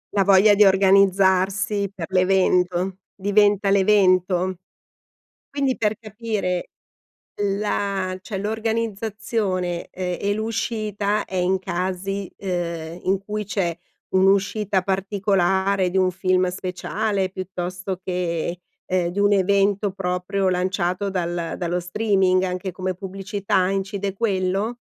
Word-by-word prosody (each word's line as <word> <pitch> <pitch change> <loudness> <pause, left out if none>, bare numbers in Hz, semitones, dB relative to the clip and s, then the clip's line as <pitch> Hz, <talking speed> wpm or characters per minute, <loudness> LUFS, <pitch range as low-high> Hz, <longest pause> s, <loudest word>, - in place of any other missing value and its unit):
La 195 - +4
voglia 200 +2 +6
di 210 - +6
organizzarsi 195 +1 +3
per 180 -5 -6
l'evento 185 -1 +2 0.2
diventa 205 0 +3
l'evento. 185 -2 +3 0.9
Quindi, 275 -2 0
per 215 -1 +1
capire, 215 -5 -3 0.7
la 200 -2 -1
cioè, 195 0 -5
l'organizzazione, 215 -4 -2
ehm, 180 -1 -3
e 205 0 +1
l'uscita 215 -2 -1
è 190 - -7
in 185 +1 +2
casi, 190 +1 -3
ehm, 170 -3 -4
in 190 +1 +2
cui 210 +2 -4
c'è 190 -4 -1 0.3
un'uscita 195 +1 +2
particolare 195 -1 +1
di 185 - -1
un 185 -1 +3
film 185 0 +1
speciale 190 +2 -2
piuttosto 185 0 -5
che, 175 -1 -2 0.3
ehm, 180 -2 0
di 175 +4 -3
un 205 0 +4
evento 200 +1 +2
proprio 180 +1 -1
lanciato 185 +1 -1
dal 175 -2 -2
dallo 175 0 -1
streaming 190 0 +1
anche 185 0 -3
come 185 +1 -3
pubblicità. 195 0 -1
Incide 195 0 -2
quello? 200 +1 -1
190 Hz, 110 wpm, -22 LUFS, 185-205 Hz, 0.9 s, voglia